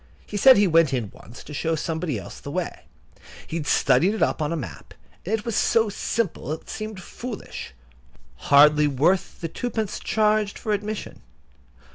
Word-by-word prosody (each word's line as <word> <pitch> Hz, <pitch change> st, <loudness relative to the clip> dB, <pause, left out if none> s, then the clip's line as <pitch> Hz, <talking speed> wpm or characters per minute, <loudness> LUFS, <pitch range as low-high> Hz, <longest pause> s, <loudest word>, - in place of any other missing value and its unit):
He -, -, -9 dB
said 260 Hz, +5 st, +7 dB
he 205 Hz, -, +5 dB
went 165 Hz, -5 st, +4 dB
in 110 Hz, -6 st, -3 dB
once 115 Hz, -, -13 dB
to 150 Hz, -, -10 dB
show 160 Hz, +2 st, -1 dB
somebody 160 Hz, -3 st, -2 dB
else 95 Hz, -, -9 dB
the -, -, -8 dB
way. -, -, -4 dB, 0.6 s
He 165 Hz, -, -4 dB
had 150 Hz, -, -4 dB
studied 155 Hz, +11 st, +3 dB
it -, -, +1 dB
up -, -, 0 dB
in 150 Hz, 0 st, -1 dB
a -, -, 0 dB
map, 145 Hz, -7 st, -8 dB, 0.3 s
and 210 Hz, +5 st, 0 dB
it 220 Hz, +1 st, -6 dB
was 230 Hz, -3 st, -2 dB
so 225 Hz, -1 st, +3 dB
simple 205 Hz, -, -2 dB
that 155 Hz, +2 st, -3 dB
it -, -, -18 dB
seemed 215 Hz, -2 st, -6 dB
foolish—hardly 65 Hz, -, 0 dB
worth 150 Hz, +7 st, +1 dB
the 165 Hz, -, -2 dB
twopence 220 Hz, +3 st, -3 dB
charged 215 Hz, -1 st, +1 dB
for 215 Hz, -, -4 dB
admission. 210 Hz, +1 st, -4 dB
165 Hz, 175 wpm, -24 LUFS, 145-215 Hz, 0.6 s, said